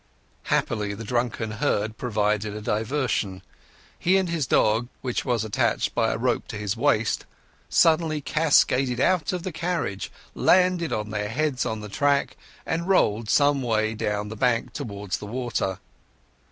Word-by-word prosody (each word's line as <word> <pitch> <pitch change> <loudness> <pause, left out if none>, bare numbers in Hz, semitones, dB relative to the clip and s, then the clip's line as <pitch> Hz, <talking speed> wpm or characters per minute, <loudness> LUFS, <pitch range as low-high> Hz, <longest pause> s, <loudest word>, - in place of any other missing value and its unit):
Happily 105 -3 0
the 115 - -7
drunken 120 -1 -1
herd 110 -2 -1
provided 105 -2 -1
a - - -4
diversion. 110 -4 -1 0.6
He 185 +2 +3
and 190 -2 0
his 160 -6 -1
dog, 110 +2 +3
which 125 -2 -2
was 120 -4 0
attached 105 - 0
by - - +1
a - - -2
rope - - 0
to - - -7
his 105 -2 -2
waist, - - +1 0.4
suddenly 160 -2 +3
cascaded 135 -5 +2
out 155 0 +2
of 180 -2 -3
the 185 - -3
carriage, 160 - -3 0.2
landed 180 -2 +3
on 105 0 -2
their 105 -1 -2
heads 135 +2 0
on 110 -1 -3
the 105 - -7
track, 140 +6 +1 0.3
and 170 +2 -2
rolled 110 - +2
some 145 -1 +3
way 110 -3 0
down 105 -1 -2
the 110 - -6
bank 120 0 0
towards 100 -3 -4
the 105 - -8
water. 115 -5 -2
120 Hz, 155 wpm, -25 LUFS, 105-150 Hz, 0.6 s, He